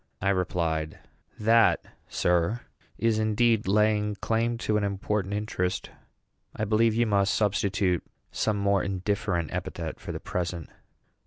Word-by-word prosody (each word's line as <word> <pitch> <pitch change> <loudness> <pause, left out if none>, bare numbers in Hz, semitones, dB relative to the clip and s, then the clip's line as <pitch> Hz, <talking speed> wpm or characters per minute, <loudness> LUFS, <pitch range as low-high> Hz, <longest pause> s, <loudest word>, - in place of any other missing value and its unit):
I 100 - 0
replied, 85 -4 -1 0.4
"That, 115 +1 +4 0.2
sir, 90 +7 +1 0.4
is 115 -1 +1
indeed 110 0 +2
laying 105 +1 +2
claim 115 +3 0
to 110 - +1
an 105 - +1
important 100 0 -1
interest. 95 -3 -2 0.6
I 110 - -1
believe 110 +1 +3
you 120 +1 +3
must 100 -2 +2
substitute 100 -3 +1 0.3
some 105 -1 0
more 100 -1 +2
indifferent 95 -3 -1
epithet - - -4
for - - -6
the - - -5
present." 85 -2 -4
105 Hz, 130 wpm, -27 LUFS, 95-110 Hz, 0.6 s, That